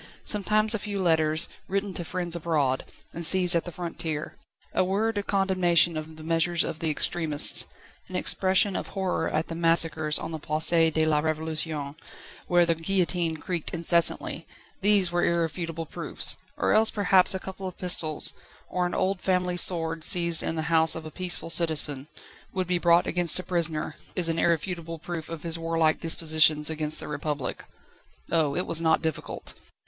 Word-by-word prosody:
Sometimes 215 +2 +2
a 220 - -2
few 205 -1 -5
letters, 160 -2 +2 0.2
written 200 0 -2
to 175 - -4
friends 175 0 -3
abroad, 150 -6 -1 0.3
and 170 - -6
seized 180 +1 +4
at 170 - 0
the 175 - -6
frontier; 165 -3 -5 0.4
a - - +2
word 205 +4 -1
of 200 - -7
condemnation 185 -4 +3
of 155 0 -7
the 155 - -12
measures 165 +1 +1
of 160 - -5
the 160 - -2
extremists; 155 -1 +2 0.4
and - - -5
expression 190 +1 +3
of - - -4
horror 190 -2 -2
at 155 +1 -1
the - - -6
massacres 165 -2 +2
on - - -6
the 160 - -5
Place 155 +2 +1 0.2
de 160 0 +1
la 150 -1 +1
Révolution, 155 -2 -3 0.5
where 175 -1 +3
the 170 - +1
guillotine 170 -1 -1
creaked 175 0 -4
incessantly 170 0 +1 0.3
these 200 -3 +3
were 175 0 0
irrefutable 165 -1 -2
proofs; - - +4 0.2
or - - +1
else 220 +1 +4
perhaps 195 -1 +2
a - - -2
couple 190 0 -8
of 185 - -9
pistols, 165 -4 +1 0.4
or 180 -1 -1
an 175 - -5
old 190 0 -1
family 180 -1 0
sword 165 -2 +3
seized 170 -1 +2
in 165 - -3
the 160 - -3
house 160 0 +4
of 160 -1 -7
a 155 - -8
peaceful 175 -2 0
citizen, 155 -4 +1 0.4
would 185 -1 -2
be 180 0 -1
brought 170 0 +3
against 175 -2 +2
a 185 - -2
prisoner, 165 -4 -2 0.2
as 175 -2 +3
an 165 0 -1
irrefutable 170 0 -2
proof 165 0 -7
of 165 -2 -7
his 165 -1 0
warlike 165 -1 0
dispositions 155 -2 +2
against 155 -1 -3
the - - -7
Republic. 145 -2 -4 0.7
Oh! 155 -4 +1
it 180 - -1
was 165 0 0
not 160 0 +1
difficult! 160 -3 -4
165 Hz, 175 wpm, -26 LUFS, 160-180 Hz, 0.7 s, seized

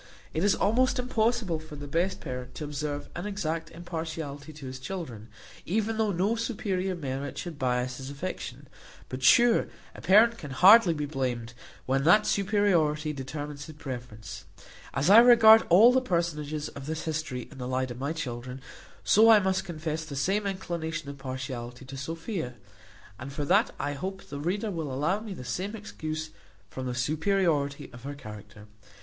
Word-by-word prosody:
It 160 - -1
is 205 0 +4
almost 255 +4 +2
impossible 230 -7 0
for 155 -1 -10
the 145 0 -7
best 175 +6 -1
parent 125 -2 -6
to 150 - -5
observe 145 0 -4
an 175 +4 -4
exact 165 -6 -3
impartiality 160 -3 -6
to 150 -2 -11
his 130 0 -6
children, 130 - -6 0.3
even 220 +4 -1
though 215 -2 +2
no 195 +5 +1
superior 200 -5 -2
merit 140 -3 -4
should 165 -5 -6
bias 125 -1 0
his 130 0 -7
affection; 140 -3 -6 0.4
but 130 +1 -5
sure 230 - +5 0.3
a - - -11
parent 225 +5 +5
can 150 - -7
hardly 185 - +7
be 150 -1 -2
blamed, 125 -5 -3 0.3
when 135 +1 +1
that 195 +7 +6
superiority 175 -7 +1
determines 145 +1 -6
his 155 - -11
preference. 120 -8 -8 0.5
As 140 +7 +2
I 215 - +10
regard 225 -2 +8
all 210 +8 +8
the 260 - +3
personages 155 - -2
of 140 0 -9
this 160 0 -3
history 155 -6 -3
in 135 - -12
the 125 - -4
light 130 0 -1
of 120 - -8
my 140 +3 -2
children; 125 -4 -5 0.4
so 220 +2 +6
I 220 - +9
must 190 -1 0
confess 160 -2 -4
the 155 -3 -7
same 195 +9 0
inclination 165 -5 -4
of 140 - -12
partiality 130 -2 -6
to 135 - -9
Sophia; 160 - -4 0.6
and 130 +2 -7
for 145 0 -3
that 200 +8 +4
I 145 - -2
hope 190 +7 -5
the 140 - -7
reader 200 +8 -1
will 160 -6 -4
allow 150 +10 0
me 215 -3 -7
the 125 - -8
same 185 - -3
excuse, 155 -7 -5 0.4
from 130 -1 -5
the 125 - -3
superiority 150 +1 0
of 125 - -11
her 140 +3 -6
character. 105 -4 -11
155 Hz, 175 wpm, -28 LUFS, 135-190 Hz, 0.6 s, I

